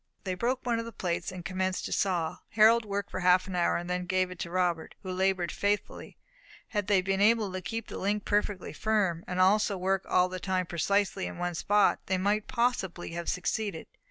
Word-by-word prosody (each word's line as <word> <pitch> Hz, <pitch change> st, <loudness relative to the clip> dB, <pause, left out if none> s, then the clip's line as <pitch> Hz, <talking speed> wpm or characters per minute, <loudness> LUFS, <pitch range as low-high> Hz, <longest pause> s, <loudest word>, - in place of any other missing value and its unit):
They 185 Hz, -, -2 dB
broke 245 Hz, +7 st, -1 dB
one 235 Hz, -2 st, +1 dB
of 230 Hz, -, -4 dB
the 230 Hz, -, -7 dB
plates, 180 Hz, -5 st, -3 dB
and 180 Hz, -2 st, -8 dB
commenced 185 Hz, 0 st, -1 dB
to -, -, -5 dB
saw. 175 Hz, -5 st, 0 dB
Harold 225 Hz, +1 st, +5 dB
worked 200 Hz, -1 st, -3 dB
for -, -, -3 dB
half 180 Hz, 0 st, +4 dB
an 190 Hz, -2 st, -5 dB
hour, 175 Hz, 0 st, +1 dB
then 180 Hz, 0 st, -3 dB
gave 185 Hz, 0 st, +1 dB
it 185 Hz, -, -9 dB
to 170 Hz, -, -4 dB
Robert, 175 Hz, -2 st, -1 dB
who 185 Hz, -, -4 dB
laboured 185 Hz, -2 st, 0 dB
faithfully. 205 Hz, 0 st, -2 dB, 0.5 s
Had 205 Hz, -3 st, -2 dB
they 195 Hz, -3 st, +3 dB
been 195 Hz, +1 st, 0 dB
able 215 Hz, -1 st, +4 dB
to 185 Hz, 0 st, -4 dB
keep 225 Hz, +3 st, -4 dB
the -, -, -7 dB
link 205 Hz, +1 st, -1 dB
perfectly 205 Hz, -2 st, -1 dB
firm, 195 Hz, -6 st, 0 dB
and 180 Hz, 0 st, -3 dB
also 200 Hz, +2 st, +4 dB
to -, -, -5 dB
work 190 Hz, +1 st, 0 dB
all 180 Hz, 0 st, +4 dB
the 185 Hz, 0 st, -6 dB
time 185 Hz, 0 st, -1 dB
precisely 195 Hz, +4 st, 0 dB
on -, -, -9 dB
one 175 Hz, 0 st, -2 dB
spot, 205 Hz, +5 st, +3 dB
they 190 Hz, -, +1 dB
might 205 Hz, +3 st, 0 dB
possibly 235 Hz, -9 st, -1 dB
have 170 Hz, 0 st, -4 dB
succeeded. 185 Hz, -1 st, -2 dB
190 Hz, 215 wpm, -29 LUFS, 180-205 Hz, 0.5 s, Harold